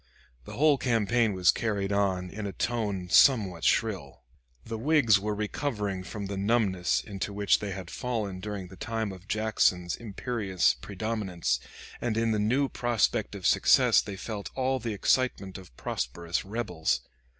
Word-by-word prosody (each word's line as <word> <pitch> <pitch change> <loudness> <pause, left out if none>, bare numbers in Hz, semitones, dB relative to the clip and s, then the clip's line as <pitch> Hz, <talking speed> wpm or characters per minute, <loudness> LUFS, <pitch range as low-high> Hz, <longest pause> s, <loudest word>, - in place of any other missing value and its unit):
The - - -9
whole 145 -1 +3
campaign 115 -2 +2
was 90 -1 +4
carried 100 -3 -2
on 95 -3 0
in 105 -1 -5
a - - -4
tone 105 -5 -2
somewhat 100 - +5
shrill. 95 - 0 0.4
The 115 -1 -5
Whigs 125 -6 +4
were 105 +1 -2
recovering 105 -3 -3
from 100 +2 -6
the 100 0 -4
numbness 100 -4 +1
into 100 0 -5
which 100 0 +2
they 105 - -4
had 95 -2 -6
fallen 110 -7 -3
during 100 -2 -6
the 95 - -12
time 110 0 -3
of 95 +1 -12
Jackson's 105 -5 +1
imperious 105 -4 0
predominance, 95 - -2 0.4
and 115 -2 -1
in 115 0 +1
the 110 - +1
new 125 +7 +2
prospect 120 -5 0
of - - -7
success - - +5
they 100 -2 -7
felt 105 +1 -6
all 130 0 0
the 115 -2 -3
excitement 100 -3 0
of 90 -10 -16
prosperous 85 +8 -3
rebels. 95 -6 -1
105 Hz, 155 wpm, -28 LUFS, 95-115 Hz, 0.4 s, somewhat